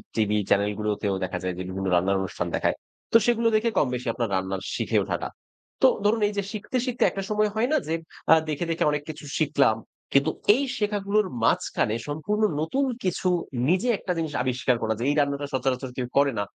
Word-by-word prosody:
TV 105 -1 +2
channel 100 +1 +3
গুলোতেও 105 -2 -1
দেখা 90 0 -2
যায় 90 0 -1
যে - - -4
বিভিন্ন 95 +1 -3
রান্নার 95 +2 +2
অনুষ্ঠান 95 - -3
দেখায়। - - +1 0.4
তো - - +10
সেগুলো 235 -1 +2
দেখে 220 +2 +2
কমবেশি 125 -3 0
আপনার 115 -2 -2
রান্নার 95 0 -2
শিখে - - 0
ওঠাটা। - - -3 0.5
তো - - +8 0.2
ধরুন 220 +2 +3
এইযে 205 -1 -2
শিখতে, 215 +4 -3
শিখতে 250 -2 0
একটা 195 - -3
সময় 210 0 +2
হয় 225 +3 +2
না 310 - +4
যে 160 - -1 0.4
আ - - +8
দেখে, 155 +2 -1
দেখে 165 - 0
অনেক 150 0 -1
কিছু 155 -1 -7
শিখলাম। 140 -7 +3 0.4
কিন্তু 140 0 +4 0.2
এই 275 - 0
শেখাগুলোর 205 -1 +1 0.2
মাঝখানে 110 -1 +1
সম্পূর্ণ 155 +9 -2 0.2
নতুন 270 - 0 0.2
কিছু 185 0 -1 0.4
নিজে 190 +7 +2
একটা 185 - -4
জিনিস 160 -2 -2
আবিষ্কার 130 0 +1
করা। 110 0 +1
যে - - -2
এই 145 - +1
রান্নাটা 140 0 0
সচরাচর 130 0 -1
কেউ 125 -2 -2
করে 140 0 +4
না। - - +1
145 Hz, 190 wpm, -25 LUFS, -, 0.5 s, তো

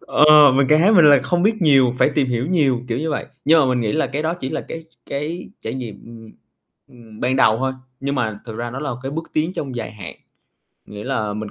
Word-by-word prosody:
ờ, 150 -2 +6
mình 140 -1 +3
càng 155 +1 +4
thấy 200 +5 +4
mình 175 -6 +6
là 140 - +6
không 175 -1 -1
biết 215 -2 +1
nhiều, 135 -5 +4
phải - - +3
tìm 135 -4 0
hiểu 120 +2 -2
nhiều, 140 -9 +1
kiểu 115 +1 -2
như 160 +1 -3
vậy. - - -3 0.2
Nhưng 160 +1 +5
mà 135 - +2
mình 125 -1 0
nghĩ 110 -2 -1
là 160 - 0
cái 140 +3 -4
đó 160 +2 -1
chỉ 135 -7 -6
là - - -3
cái 165 -1 -9 0.3
cái 150 +5 -5
trải 110 - -5
nghiệm, 120 -5 -8
ừm, 115 -1 -13 0.6
ừm, 115 -3 -16
ban 130 +2 0
đầu 110 -4 +3
thôi, 130 +1 -1 0.3
nhưng 140 +1 -2
mà 110 -6 -3
thực 110 -2 -8
ra 120 0 -5
nó 135 +3 -6
là 150 - -3
cái 135 - -5
bước 165 +1 -6
tiến 160 +4 0
trong 135 -7 -6
dài 110 -2 -5
hạn. 95 -5 -10 0.7
Nghĩa 105 0 -9
là 110 -6 -2
mình 105 -1 -6
135 Hz, 255 wpm, -20 LUFS, 115-155 Hz, 0.7 s, ờ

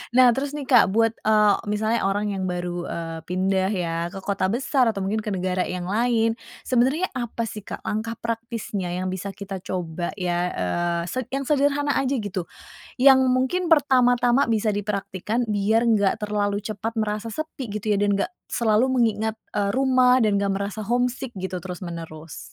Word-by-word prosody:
Nah, 255 -1 +8
terus 275 +1 -2
nih, 290 -3 -6
Kak, 240 -7 +5
buat, 225 +1 +2
eee, 210 -1 +5
misalnya 215 +2 0
orang 205 +1 0
yang 190 - -3
baru, 175 -1 -3
eee, 165 -1 -5
pindah 190 +1 +1
ya 170 -4 -2 0.2
ke 195 - -7
kota 195 -1 -1
besar 255 -1 +2
atau 200 - -6
mungkin 215 +2 -1
ke 210 - -3
negara 185 -1 0
yang 180 -1 -4
lain. 225 +1 +1 0.3
Sebenernya 265 +9 +2
apa 235 -1 -3
sih 210 -1 -7
Kak, - - -7
langkah 225 +2 -2
praktisnya 230 -5 -4
yang 185 +1 -2
bisa 190 +1 -4
kita 195 -1 -7
coba 175 -2 -3
ya, 175 -1 0
eee, 170 - -1
se 255 +8 -2
yang 275 +1 -1
sederhana 285 0 +2
aja 270 0 +1
gitu, 195 -4 -3 0.6
yang 270 0 +7
mungkin 260 +8 +1
pertama-tama 255 -4 +4
bisa 220 -2 +1
dipraktikkan 205 +2 -2
biar 210 +3 +2
enggak 215 -4 +3
terlalu 205 -1 0
cepat 220 +2 -4
merasa 215 0 -2
sepi 310 -2 -5
gitu 210 0 -3
ya 205 - +3
dan 205 -1 +2
enggak 200 - -1 0.2
selalu 225 +2 +2
mengingat, 220 -4 +1 0.2
eee, 205 -1 0
rumah 255 -1 +4
dan 205 -2 +2
enggak 200 -1 0
merasa 210 +2 -5
homesick 245 +1 -1
gitu 185 -1 -4
terus 180 +1 -7
menerus? 165 -2 -8
215 Hz, 175 wpm, -24 LUFS, 190-245 Hz, 0.6 s, Nah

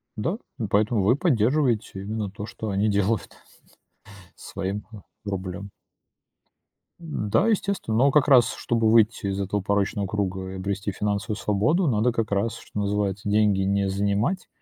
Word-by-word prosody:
Да, 165 - -2 0.2
и 110 - -2
поэтому 105 +1 +2
вы 105 +5 +4
и - - +1
поддерживаете 125 - +1
именно 105 0 -3
то, 100 +2 -7
что 110 0 -6
они 100 +2 +1
делают 100 +1 0 1.0
своим, 100 +2 -5
э, 110 - -9 0.3
рублём. 100 0 -5 1.3
М-да, 160 - 0
естественно, 200 - 0
но 135 +4 +4
как 150 0 +4
раз, 125 -5 +5
чтобы 115 -2 +1
выйти 110 -2 +3
из 100 0 -2
этого 100 +1 -1
порочного 100 +1 0
круга 95 -2 -3
и - - -7
обрести 100 +2 -3
финансовую 105 +2 -2
свободу, 130 - +1
надо 120 -1 +2
как 115 -3 -2
раз, 100 +3 0
что - - -7
называется, 100 0 -1
деньги 105 -2 +3
не 100 0 +1
занимать 100 - 0
105 Hz, 150 wpm, -25 LUFS, 100-115 Hz, 1.3 s, раз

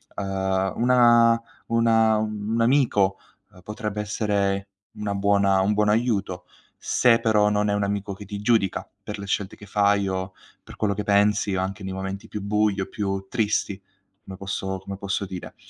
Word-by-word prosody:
Uhm, 95 -1 -1
una 120 -1 +5 0.3
una 115 -1 +3
un 105 0 -3
un 115 - +1
amico, 115 -6 +3 0.3
uhm, 90 - -17
potrebbe 105 +1 -4
essere 100 -2 -1 0.3
una 105 -1 -3
buona 100 -1 +3
un 100 +2 +2
buon 105 0 +2
aiuto, 105 -5 0 0.3
se 115 -2 +3
però 105 -2 +3
non 105 0 +1
è - - +1
un 105 0 0
amico 100 0 -2
che 100 +2 -10
ti 100 +1 -6
giudica 105 -4 +1 0.2
per 105 - -6
le 100 - -6
scelte 100 -1 -2
che 105 - -13
fai, 100 0 +2
o 95 0 -3 0.3
per - - -12
quello 105 -2 0
che 105 +1 -4
pensi, 105 0 +2
o 95 - 0
anche 95 +2 -4
nei 95 0 -4
momenti 95 +1 -5
più 105 - -6
bui 105 0 +1
o 95 - -1
più 95 -2 -3
tristi, 105 -3 -1 0.4
come 95 -1 -9
posso 95 -1 -4
come 100 +1 -7
posso 100 +1 -2
dire. 95 -2 -8
100 Hz, 180 wpm, -24 LUFS, 95-105 Hz, 0.4 s, una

